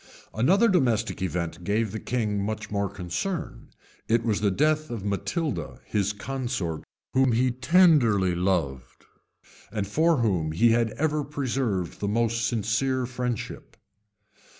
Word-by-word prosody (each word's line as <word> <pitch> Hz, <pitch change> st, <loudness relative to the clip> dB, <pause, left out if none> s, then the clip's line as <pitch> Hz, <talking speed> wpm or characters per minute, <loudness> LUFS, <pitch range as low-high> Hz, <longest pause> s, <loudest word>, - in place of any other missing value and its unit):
{1083.} -, -, -9 dB
Another 195 Hz, -, +5 dB
domestic 115 Hz, -, +1 dB
event 85 Hz, -2 st, -3 dB
gave 105 Hz, +3 st, 0 dB
the 110 Hz, -, -4 dB
king 105 Hz, -5 st, -1 dB
much 110 Hz, +1 st, -4 dB
more 100 Hz, -1 st, 0 dB
concern: 95 Hz, -, -4 dB, 0.4 s
it 115 Hz, +1 st, +2 dB
was 110 Hz, -3 st, 0 dB
the 105 Hz, -, +3 dB
death 155 Hz, +8 st, +1 dB
of 115 Hz, -4 st, -5 dB
Matilda, 140 Hz, -, -2 dB
his 100 Hz, -1 st, 0 dB
consort, 110 Hz, -7 st, -3 dB, 0.3 s
whom 130 Hz, -2 st, +3 dB
he 125 Hz, +2 st, +2 dB
tenderly 130 Hz, -, +4 dB
loved, 85 Hz, -8 st, -2 dB, 0.7 s
and 105 Hz, -3 st, -2 dB
for 160 Hz, -, +2 dB
whom 90 Hz, -10 st, 0 dB
he 115 Hz, +8 st, +4 dB
had 115 Hz, 0 st, +2 dB
ever 155 Hz, 0 st, 0 dB
preserved 130 Hz, -, -2 dB
the 100 Hz, -, -2 dB
most 115 Hz, +2 st, +1 dB
sincere 120 Hz, +4 st, 0 dB
friendship. 125 Hz, -2 st, -5 dB
115 Hz, 135 wpm, -26 LUFS, 100-130 Hz, 0.7 s, Another